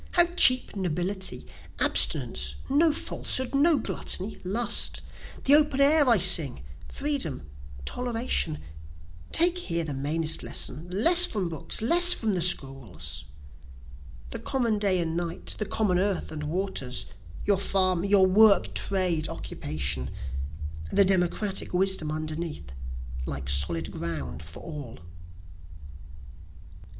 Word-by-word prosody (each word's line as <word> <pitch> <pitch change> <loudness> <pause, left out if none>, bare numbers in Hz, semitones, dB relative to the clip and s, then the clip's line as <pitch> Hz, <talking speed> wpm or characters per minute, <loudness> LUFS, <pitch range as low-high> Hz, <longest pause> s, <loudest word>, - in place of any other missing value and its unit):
how 345 -1 +5
cheap 255 -9 +5
nobility! 190 +1 -3 0.3
Abstinence, - - +2 0.2
no 310 +3 +3
falsehood, 260 -3 -2
no 295 +3 +3
gluttony, 215 -4 -2
lust; 220 +6 0 0.4
The 275 - +6
open 295 -2 +4
air 285 0 +4
I 230 - +6
sing, 160 - +4 0.3
freedom, 280 - -3 0.4
toleration, 235 -10 -1 0.7
(Take 350 +2 +2
here 170 - -3
the 150 -3 -5
mainest 155 +4 -2
lesson 150 +7 -1
less 335 - +4
from 195 -5 -3
books 160 +6 +2
less 350 +8 +5
from 220 -3 -2
the 180 - -1
schools,) 135 - -2 1.1
The - - -5
common 235 -6 -1
day 195 -3 +1
and 165 -1 -3
night 170 0 -3
the 215 - -3
common 195 -3 0
earth 195 0 -2
and 150 -1 -6
waters, 150 -7 -2 0.4
Your 200 -2 +2
farm 185 -2 +1
your 200 -1 +4
work, 200 +2 +4
trade, 180 -5 +1
occupation, 70 -4 -5 0.8
The 200 - +4
democratic 190 +1 -1
wisdom 190 -4 +1
underneath, 155 - -6 0.6
like 65 -1 -6
solid 80 +3 +1
ground 75 -4 -5
for 80 +1 -12
all. 145 -8 -9
185 Hz, 120 wpm, -26 LUFS, 155-225 Hz, 1.1 s, The